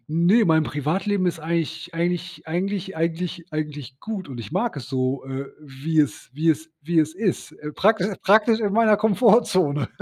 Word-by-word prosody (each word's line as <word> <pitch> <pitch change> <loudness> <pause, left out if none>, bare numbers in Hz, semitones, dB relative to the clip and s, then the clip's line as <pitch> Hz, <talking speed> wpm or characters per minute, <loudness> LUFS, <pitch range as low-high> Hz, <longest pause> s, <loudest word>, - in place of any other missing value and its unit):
ne, 175 +8 +4
mein 160 -1 +4
Privatleben 185 +7 -1
ist 170 - -1
eigentlich 165 +1 -3
eigentlich 175 -1 -3
eigentlich 190 +2 -3
eigentlich 170 +1 -2
eigentlich 145 -4 -5
gut, 205 -6 -5
und 125 -3 -8
ich 130 - -9
mag 210 -2 -1
es 125 - -7
so, 130 0 -1
äh, 135 +1 -5
wie 150 +3 -3
es 145 -3 -2
wie 160 +4 -1
es 160 +1 -2
wie 165 +1 0
es 155 +1 -1
ist, 190 -1 -2
äh, 150 0 -8
prakti 210 +1 +2 0.2
praktisch 220 +3 +4
in 205 -2 0
meiner 220 -1 +5
Komfortzone. 200 - +3
165 Hz, 175 wpm, -23 LUFS, 150-195 Hz, 0.2 s, meiner